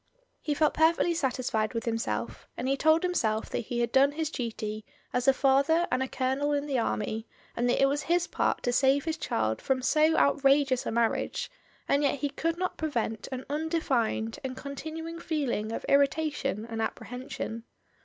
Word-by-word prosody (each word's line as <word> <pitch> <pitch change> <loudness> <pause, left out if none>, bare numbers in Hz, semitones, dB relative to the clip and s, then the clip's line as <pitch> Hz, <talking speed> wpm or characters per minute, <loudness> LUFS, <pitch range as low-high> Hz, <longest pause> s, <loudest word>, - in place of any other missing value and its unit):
He 295 - -1
felt 305 +1 +3
perfectly 330 +2 +3
satisfied 250 -7 -1
with 230 - -2
himself, 115 - -3
and 250 - -2
he 270 - +2
told 315 +4 +3
himself 225 -12 0
that - - -1
he 240 +1 -3
had 235 -1 0
done 275 +2 +4
his 315 0 -2
duty 215 -4 -4 0.3
as 250 +1 0
a - - +9
father 275 +6 +3
and 255 - +1
a 265 - 0
colonel 265 +3 0
in 285 0 0
the 275 -4 0
army, 220 0 -2 0.3
and 240 +1 +1
that - - +2
it 275 - +6
was 285 +2 +1
his 350 +1 +1
part - - -1
to 245 - 0
save 270 +3 +3
his 320 -1 -1
child 110 0 -1
from 260 -1 0
so 310 +3 +3
outrageous 275 -2 +3
a - - -1
marriage, 230 - 0 0.4
and 280 - +3
yet 285 -1 +2
he 285 +1 -2
could 330 +4 -2
not 370 0 -2
prevent 230 -8 -2
an 260 0 -5
undefined 285 -8 -1
and 260 -1 -5
con^ 280 +1 -6
tinuing 325 +2 -6
feeling 250 -9 -1
of - - -4
irritation 280 -5 +1
and 225 -1 -4
apprehension. 230 0 -5
270 Hz, 185 wpm, -28 LUFS, 235-305 Hz, 0.4 s, a